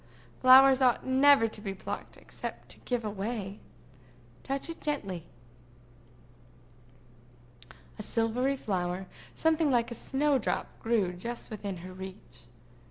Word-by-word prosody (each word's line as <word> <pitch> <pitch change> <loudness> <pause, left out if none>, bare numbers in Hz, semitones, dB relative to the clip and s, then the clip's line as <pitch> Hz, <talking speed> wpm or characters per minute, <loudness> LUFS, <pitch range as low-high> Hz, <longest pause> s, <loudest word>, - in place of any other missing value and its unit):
Flowers 265 +1 +8
ought 250 -2 +3
never 265 -2 +5
to 215 -1 -9
be 195 -2 -4
plucked - - -7
except - - -8
to - - -9
give 245 -3 -2
away. 205 0 -4 0.8
Touch 275 0 -3
it 330 - -7
gently." 195 - -3 2.7
A - - -3
silvery 240 +5 0
flower, 185 -4 -2 0.3
something 320 -1 +2
like 240 -2 +1
a - - -2
snow 275 +3 +1
drop, - - -2
grew 220 -6 +1
just 235 +7 -6
within 200 -3 -5
her 185 - -8
reach. 185 - -11
230 Hz, 120 wpm, -29 LUFS, 195-265 Hz, 2.7 s, Flowers